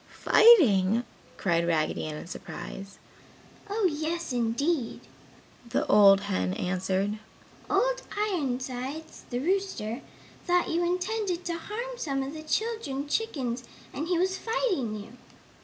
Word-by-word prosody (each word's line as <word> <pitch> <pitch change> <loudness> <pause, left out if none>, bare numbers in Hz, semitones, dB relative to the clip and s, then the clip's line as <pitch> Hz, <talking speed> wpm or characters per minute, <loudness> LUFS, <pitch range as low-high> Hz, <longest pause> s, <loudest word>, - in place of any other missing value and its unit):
"Fighting!" 235 - +6 0.3
cried 170 -2 +1
Raggedy 160 -2 0
Ann 155 - -5
in - - -8
surprise. 195 +2 -8 0.7
"Oh 415 0 0
yes, 320 -1 -1
indeed!" 245 +4 0 0.7
the 245 - 0
old 200 -1 +7
hen 95 - -1
answered, 190 - -1 0.5
"Old - - +2 0.2
Ironsides, 275 -6 -3
the 245 - -2
rooster, 285 - -1 0.5
thought 355 0 +2
you 340 +1 +1
intended 365 +1 -1
to 345 - -1
harm 470 +9 -5
some 275 - -1
of 275 +2 -5
the 310 - -7
children 310 -6 -2
chickens 265 - -2 0.3
and 305 +4 -3
he 355 -1 +1
was 375 +2 +1
fighting 380 - -1
you!" 215 +2 -9
285 Hz, 125 wpm, -28 LUFS, -, 0.7 s, old